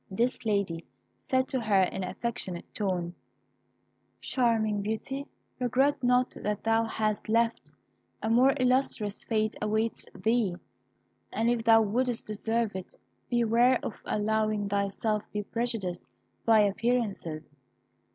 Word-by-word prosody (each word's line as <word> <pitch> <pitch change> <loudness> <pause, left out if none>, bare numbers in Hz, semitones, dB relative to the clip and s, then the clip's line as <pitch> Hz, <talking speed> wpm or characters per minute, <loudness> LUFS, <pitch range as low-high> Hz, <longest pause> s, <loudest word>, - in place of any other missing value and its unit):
This 230 +4 -1
lady 200 -6 0 0.4
said 260 -1 0
to 260 - -1
her 205 -4 +3
in 185 +1 -2
an 180 - -3
affectionate 190 -3 -4
tone 180 -4 -2 1.1
"Charming 220 -5 +1
Beauty, 245 +7 -3 0.3
regret 265 +3 +2
not 250 0 +3
that 210 0 -2
thou 225 0 +3
hast 215 -1 -2
left; 230 +1 +1 0.5
a - - -3
more 250 +4 +5
illustrious 250 -5 +1
fate 215 -2 0
awaits 220 +2 -1
thee; 220 -5 +1 0.8
but 225 - -1
if 235 -1 +2
thou 225 -1 +7
wouldst 240 +3 0
deserve 220 0 -1
it, 190 -1 -7 0.3
beware 240 +1 +4
of - - -3
allowing 215 -1 0
thyself 200 +2 0
to - - -39
be 210 0 -2
prejudiced 220 -6 -3 0.4
by 225 -2 +6
appearances." 200 -9 -1
220 Hz, 125 wpm, -29 LUFS, 205-240 Hz, 1.1 s, thou